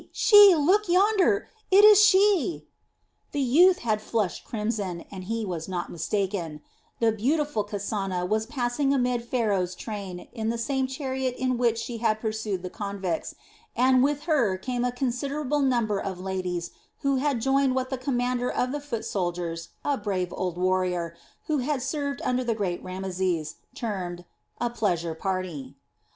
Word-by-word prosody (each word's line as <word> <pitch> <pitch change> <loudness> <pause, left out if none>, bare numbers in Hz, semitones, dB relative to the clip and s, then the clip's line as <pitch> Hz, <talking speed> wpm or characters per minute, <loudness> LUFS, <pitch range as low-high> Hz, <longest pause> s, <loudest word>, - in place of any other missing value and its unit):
She! 410 -4 +8
Look 370 +7 +2
yonder! 400 +2 +3 0.2
It 400 +2 +7
is 420 -1 +8
she!" 390 -3 +3 0.7
The 290 - -1
youth 345 +9 +5
had 215 -2 +1
flushed 215 -4 -2
crimson, 210 -6 -3
and 185 -2 -7
he 225 +2 -2
was 170 -4 -4
not 180 -2 -4
mistaken; 175 -3 -2 0.4
the 230 -1 +3
beautiful 270 +2 0
Kasana 195 -3 -3
was 215 +2 0
passing 270 +2 0
amid 250 -2 0
Pharaoh's 205 -7 0
train 195 -4 -7
in 225 -2 -2
the 235 - -1
same 265 +3 -1
chariot 265 -1 -3
in 255 0 0
which 235 -2 +1
she 230 0 -5
had 220 -2 +1
pursued 215 -4 -3
the 180 - -4
convicts, 200 -5 -4 0.4
and 255 +1 +4
with 290 +1 0
her 270 - +2
came 245 +5 -3
a 250 - +1
considerable 275 +3 -2
number 235 -6 +1
of 190 -3 -4
ladies 185 -2 -3 0.3
who 275 -1 +1
had 275 -2 0
joined 270 +1 +2
what 260 0 -2
the 265 - -1
commander 250 -1 -1
of 250 - -1
the 290 +1 -3
foot 255 -6 -4
soldiers, 175 -3 -3 0.2
a 285 -2 0
brave 185 -4 -2
old 180 -2 -3
warrior, 180 -2 0 0.3
who 305 -2 0
had 275 +2 -1
served 285 0 -3
under 255 0 0
the 235 -2 0
great 190 -5 -2
Rameses, 185 -4 -2 0.2
termed 185 -8 -4 0.3
"a 240 -1 -1
pleasure 175 -8 -1
party." 160 -6 -4
230 Hz, 160 wpm, -26 LUFS, 185-270 Hz, 0.7 s, She